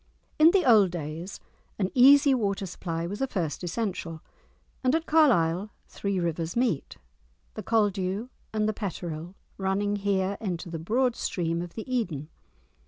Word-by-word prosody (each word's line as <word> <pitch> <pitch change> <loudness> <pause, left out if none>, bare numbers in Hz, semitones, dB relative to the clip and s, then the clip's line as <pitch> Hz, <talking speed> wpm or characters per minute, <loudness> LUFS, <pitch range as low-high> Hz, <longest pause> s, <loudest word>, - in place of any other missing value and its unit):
In 310 +2 +8
the 375 -2 +3
old 215 -6 +6
days 170 +2 -6 0.4
an 190 -2 -1
easy 275 +2 +7
water 200 -5 -1
supply 165 -2 -4
was 200 +7 -5
a 270 - +1
first 170 - -3
essential, 175 -4 -3 0.6
and 255 +3 +3
at 325 0 -1
Carlisle 210 - +3 0.2
three 200 -2 -2
rivers 170 -1 -2
meet, 235 - -1 0.6
the - - -6
Caldew 205 0 0 0.2
and 215 -1 0
the 215 - 0
Petterill 175 -4 -5 0.2
running 200 +2 0
here 200 -1 0
into 175 -4 -4
the 165 - -4
broad 240 +8 +1
stream 170 -1 -2
of 175 -1 -8
the 220 - -5
Eden. 180 - -2
195 Hz, 150 wpm, -27 LUFS, 170-230 Hz, 0.6 s, In